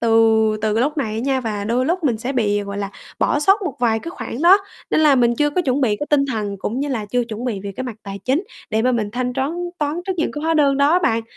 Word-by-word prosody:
từ 230 - 0 0.5
từ 215 -1 +1
cái 225 - +2
lúc 295 +3 -1
này 225 -7 -1
á - - -2
nha 265 0 0
và 210 -4 -3
đôi 245 +4 0
lúc 350 0 -1
mình 240 -6 +2
sẽ 250 +5 -3
bị, 205 -4 +1
gọi 200 0 -6
là, 200 -1 -3 0.3
bỏ 295 - +2
sót 390 +7 +4
một 335 -8 -3
vài 225 -2 +2
cái 330 +9 -7
khoản 275 -4 -6
đó, 375 +4 +7 0.3
nên - - +3
là 300 -3 +6
mình 240 -2 +3
chưa 295 0 +2
có 360 - 0
chuẩn 275 -2 0
bị 215 -5 +2
cái 295 - -4
tinh 280 -2 +4
thần, 205 -3 -3
cũng 240 +7 -3
như 290 - -1
là 225 -6 -2
chưa 245 +3 0
chuẩn 230 +1 -6
bị 215 -6 -2
về 200 0 -6
cái 260 - -3
mặt 240 -4 -6
tài 195 0 -7
chính, 285 +10 +1 0.3
để 220 +1 +1
mà 255 +1 +2
mình 215 -3 -1
thanh 250 +1 -2
troán 265 +5 -1 0.3
toán 300 +3 -1
trước 380 - 0
những 315 - -1
cái 295 - -5
hóa 325 - +2
đơn 285 -3 +3
đó 280 +1 +4
á 355 - +5
bạn, 225 -4 +1
255 Hz, 300 wpm, -20 LUFS, 220-295 Hz, 0.5 s, đó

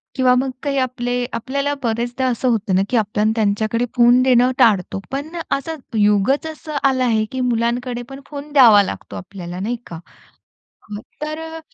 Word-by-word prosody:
किंवा 255 -2 +4
मग 260 +2 0
काही 280 -1 -1
आपले 245 -1 -1
आपल्याला 280 +4 -2
बरेचदा 240 +2 -1
असं 250 +1 -1
होतं 210 -5 0
ना, 190 - +3
की 250 - +1
आपल्याला 210 0 +1
त्यांच्याकडे 220 +2 0
फोन 245 +1 +5
देणं 250 -1 +4
टाळतो. 205 -7 +3
पण 285 +5 -5 0.2
असं 300 +4 -2 0.2
युगच 210 +8 +2
असं 310 -1 -7
आलं 265 -2 +2
आहे, 225 -3 +2
की 260 - -4
मुलांकडे 240 +1 -1
पण 270 0 -9
फोन 290 0 -8
द्यावा 230 -8 +7
लागतो, - - -7
आपल्याला 180 -2 -8
नाही 230 +5 -2
का? 165 - -8 0.9
अ, 205 - -5 0.2
तर 305 +1 -3 0.2
अ, - - -8
245 Hz, 170 wpm, -19 LUFS, 215-270 Hz, 0.9 s, द्यावा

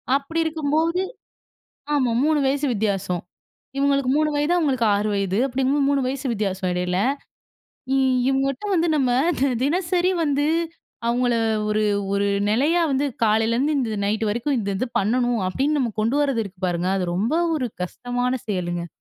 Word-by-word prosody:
அப்பிடி 285 +4 -2
இருக்கும்போது 320 +3 0 0.9
ஆமா 255 -5 +2
3 305 -1 +2
வயசு 280 +2 +1
வித்தியாசம் 195 -4 -1 0.6
இவுங்களுக்கு 275 -2 +2
3 305 0 +2
வயது, 295 +4 +1
அவுங்களுக்கு 265 -8 +1
6 210 +1 0
வயது. 200 0 0
அப்பிடிங்கம்போது 270 +2 +1
3 280 -1 +2
வயசு 270 +1 -4
வித்தியாசம் 195 -3 -2
இடையில. 180 0 -1 1.0
இ - - +3 0.3
இவங்கட்ட 270 +4 -1
வந்து 335 0 +2
நம்ம 260 -3 +2 0.3
தி 275 - +3 0.2
தினசரி 355 +3 +1
வந்து 290 0 +1 0.6
அவுங்கள 245 0 +1 0.3
ஒரு, 215 0 +1 0.3
ஒரு 200 0 +1 0.2
நிலையா 300 +10 +2
வந்து 270 +2 +1 0.2
காலையிலேருந்து 230 +7 +2
இந்த 225 -5 -1
நைட்டு 215 +1 0
வரைக்கும் 240 +5 -1
இந்த 200 -2 -2
இது 255 - -1
பண்ணணும் 240 +2 +1
அப்பிடின்னு 285 +9 0
நம்ம 240 -5 -1
கொண்டு 230 +6 +1
வர்றது 270 -6 0
இருக்கு 190 -2 -12
பாருங்க! 175 +1 -1
அது 180 - -1
ரொம்ப 220 - 0 0.2
ஒரு 255 -4 -2 0.2
கஷ்டமான 245 +5 -2
செயலுங்க. 175 -3 -2
255 Hz, 150 wpm, -23 LUFS, 210-285 Hz, 1.0 s, இ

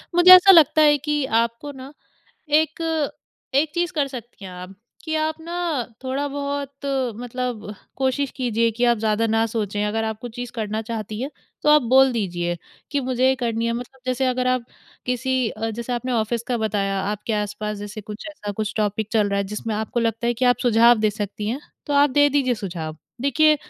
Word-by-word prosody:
मुझे 350 +1 +8
ऐसा 370 +2 +8
लगता 315 -3 +6
है 295 -1 +6
कि 295 0 -1 0.2
आपको 235 +5 -8
ना 265 +2 -10 0.6
एक 315 0 +1 0.4
एक 295 +2 +2
चीज़ 350 0 0
कर 295 -5 +1
सकती 240 -5 -10
हैं 185 - -8
आप 180 +1 -9 0.3
कि 315 -1 -2
आप 310 0 0
ना 335 +1 -8 0.5
थोड़ा-बहुत 280 +1 -3 0.3
मतलब 245 -3 -4 0.2
कोशिश 265 +1 0
कीजिये 230 -3 +1
कि 235 +2 -1
आप 240 -1 +3
ज़्यादा 215 +1 +1
ना 225 0 +2
सोचें। 210 -2 -2
अगर 220 +2 -1
आप 220 -1 -3
कुछ 240 -2 -8
चीज़ 245 0 -5
करना 215 -1 -3
चाहती 215 -1 -5
हैं 270 +3 -3 0.3
तो - - +1
आप 300 -1 +6
बोल 265 0 +7
दीजिये 175 -6 -2 0.3
कि 285 - 0
मुझे 255 -1 +1
ये 265 - +4
करनी 230 -2 -1
है। 230 - 0
मतलब 245 +2 -7
जैसे 255 +1 0
अगर 255 0 0
आप 255 -1 +1 0.4
किसी 250 -1 0 0.2
जैसे 235 +3 -5
आपने 245 +1 -2
ऑफ़िस 230 0 0
का 245 - +1
बताया 195 -3 -1
आपके 210 +3 -3
आसपास 210 0 -2
जैसे 205 +1 -7
कुछ 210 +6 -9
ऐसा 210 -9 -6
कुछ 210 0 -3
टॉपिक 210 0 -1
चल 215 -3 +3
रहा 200 0 0
है 200 - 0
जिसमें 210 +2 -4
आपको 220 +3 -2
लगता 230 0 -1
है 240 - +1
कि 250 +2 -1
आप 245 0 +5
सुझाव 235 -1 +5
दे 215 0 +2
सकती 205 0 -5
हैं, 250 +6 -2 0.3
तो 290 - -2
आप 285 0 +5
दे 290 +2 +5
दीजिए 265 -3 +2
सुझाव। 170 -7 -5 0.2
देखिए, 305 +3 +4
240 Hz, 200 wpm, -22 LUFS, 215-275 Hz, 0.6 s, मुझे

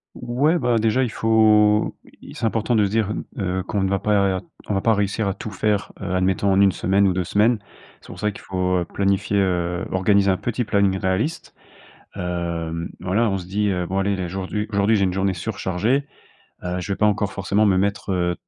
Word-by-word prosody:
Ouais, 135 +8 +1
bah 120 -7 +1
déjà 115 +4 +2
il 125 - -1
faut, 110 -1 +3 0.3
il - - -11
c'est - - -2
important 115 +2 0
de 105 -2 +4
se - - -1
dire 110 -1 0
n - - -4
heu, 95 -1 -2
qu'on 100 +1 -2
ne 95 - +1
va 100 -1 0
pas 100 -3 +1 0.3
on 105 - +1
va 95 - +1
pas 115 +3 +3
réussir 100 +1 0
à 100 - 0
tout 110 +2 -7
faire, 105 0 -1
heu, 95 -1 -3
admettons 95 +2 +1
en 95 +1 +4
1 100 - +5
semaine 95 +2 +1
ou 95 - +3
2 90 0 -1
semaines. 110 +5 +2 0.4
C'est - - -18
pour 90 - -10
ça 105 - +1
qu'il 100 - -11
faut, 90 -1 -1
heu, 90 - -1
planifier, 100 +1 0
heu, 90 -1 0
organiser 100 +1 +3
un 95 - 0
petit 120 +1 -2
planning 100 -3 +1
réaliste. 95 - -2 0.6
Hem, 85 -2 -3
voilà, 100 +5 +1
on 95 - -1
se 90 - -8
dit: 105 +3 0
«Heu, 90 -2 -1
bon 95 +2 -2
allez, 100 +1 +1
là 95 -2 -3
aujourd'hui- 95 +3 -3
aujourd'hui, 100 +2 +2
j'ai 100 - +2
une 90 -1 0
journée 95 0 +1
surchargée, 100 +7 -1 0.6
heu, 90 0 -2
je 95 +3 -3
vais - - -2
pas 105 - +3
encore 105 -1 0
forcément 100 +2 +1
me 100 -3 +3
mettre, 100 +1 -1
heu, 90 -1 0
100 Hz, 225 wpm, -22 LUFS, 95-105 Hz, 0.6 s, 1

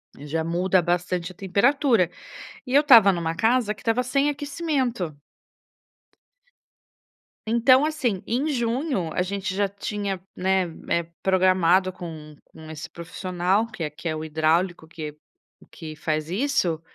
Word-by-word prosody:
Já 150 +3 -3
muda 180 +3 +2
bastante 175 +1 -1
a - - -15
temperatura. 210 - +2 0.6
E 255 - -3
eu 285 - +8
estava 230 -9 +8
em 185 - 0
uma 165 -1 -2
casa 225 +2 +2
que 200 - -17
estava 230 +2 +1
sem 275 +3 +1
aquecimento. 275 - -2 2.3
Então 245 +5 +4
assim, 260 -11 -1
em 255 +6 -1
junho, 240 - -1
a - - 0
gente 190 +1 -3
já 200 0 +1
tinha, 200 -1 -4 0.2
né, 190 0 +1 0.3
eh, 170 - +1 0.2
programado 185 -1 +3
com 160 -4 -9
com 160 0 -14
esse 155 0 -8
profissional, 180 +4 -1
que 205 -7 -7
é 155 - -2
que 150 +3 -8
é 155 - -2
o 155 - -5
hidráulico 160 +2 0
que 155 -2 -7 0.6
que 155 -1 -9
faz 155 0 -2
isso. 190 - 0
185 Hz, 140 wpm, -24 LUFS, 165-235 Hz, 2.3 s, eu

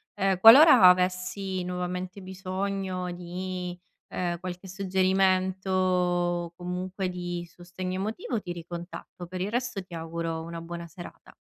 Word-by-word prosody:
Ehm, 195 -2 +1
qualora 255 - +9
avessi 185 +1 0
nuovamente 180 +1 -4
bisogno 190 0 -3
di, 180 0 -5 0.3
ehm, 175 -1 -3
qualche 180 +1 -7
suggerimento, 185 -2 +1
comunque 180 +2 -4
di 175 -1 -4
sostegno 180 +2 -6
emotivo 215 +3 -3
ti 175 - -5
ricontatto. 175 +1 -8
Per 185 +1 -6
il 195 +3 -2
resto 245 -4 -2
ti 180 - -15
auguro 165 0 -4
una 165 0 -7
buona 170 0 -7
serata. 175 +2 -12
185 Hz, 120 wpm, -27 LUFS, 175-190 Hz, 0.3 s, qualora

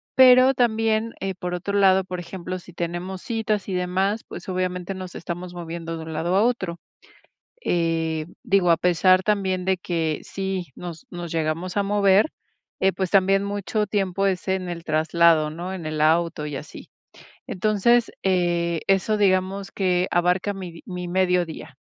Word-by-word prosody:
Pero 255 0 +7
también, 225 -2 +1
eh, 195 0 -2
por 180 -1 -4
otro 195 +3 -4
lado, 190 -1 +5
por 180 -1 -6
ejemplo, 180 +1 -6
si 180 - -14
tenemos 175 +2 -4
citas 220 -4 -1
y 190 - -3
demás, 190 +4 0
pues, - - -9
obviamente, 185 0 -2
nos 185 -1 -8
estamos 175 +1 -6
moviendo 165 -1 -5
de 160 - -7
un 160 - -7
lado 170 +4 -1
a 200 - +4
otro. 190 -8 -1 0.8
Eh, 165 -2 0 0.2
digo, 190 -3 +3
a 165 - +6
pesar 185 +1 +4
también 190 -2 0
de 190 0 +2
que, 165 -3 -2
sí 190 -2 -4
nos 170 -3 -8
nos 175 -1 -6
llegamos 165 +4 -2
a 200 - +3
mover, 200 +4 +3 0.5
eh, 190 0 +3
pues, 190 -2 -2
también 195 0 +3
mucho 205 +1 -2
tiempo 195 -1 0
es 190 0 -1
en 190 -1 -1
el 170 -1 -5
traslado, 160 0 +3
¿no? 175 +4 -6
En 175 -4 -7
el 155 0 -3
auto 160 0 +2
y 145 -2 -5
así. - - -9 0.6
Entonces, 215 +4 +2
eh, 175 -3 +1
eso, 195 +2 +2
digamos, 195 0 +1
que 180 -2 +1
abarca 180 +3 +1
mi 180 -4 -8
mi 180 -1 -5
mediodía. 180 -5 0
185 Hz, 165 wpm, -23 LUFS, 170-195 Hz, 0.8 s, Pero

